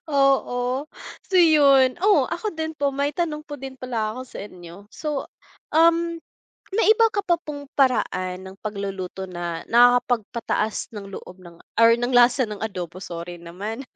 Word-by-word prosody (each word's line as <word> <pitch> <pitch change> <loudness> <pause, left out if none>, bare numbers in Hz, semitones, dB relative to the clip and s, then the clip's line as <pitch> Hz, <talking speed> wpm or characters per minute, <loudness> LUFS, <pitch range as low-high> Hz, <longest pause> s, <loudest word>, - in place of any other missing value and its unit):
Oo, 270 -2 +1 0.5
so 375 - +2
'yun. 280 -6 +6
Oh, 415 0 +4
ako 430 - -3
din 320 -2 -4
po, 285 -1 0
may 280 +2 -2
tanong 310 -3 -3
po 290 - -7
din 265 -1 -9
pala 230 -4 -2
ako 250 +4 -7
sa - - -11
inyo. 185 +1 -12
So, 300 -3 -4 0.4
um, 335 +1 +3 0.5
may 440 +4 +1
iba 455 0 +4
ka 410 - -4
pa 345 - +4
pong 295 -4 -7
paraan 185 -8 0
ng 190 - -10
pagluluto 195 -2 -5
na 175 -2 -5
nakakapagpataas 240 -2 +2
ng 200 -2 -8
loob 185 0 -14
ng 170 -1 -14 0.2
or 230 - +8
ng 245 +1 -1
lasa 245 +1 +5
ng 210 0 -7
adobo? 185 -3 -5
Sorry 170 0 -7
naman. 205 +8 -6
245 Hz, 160 wpm, -23 LUFS, 195-290 Hz, 0.5 s, or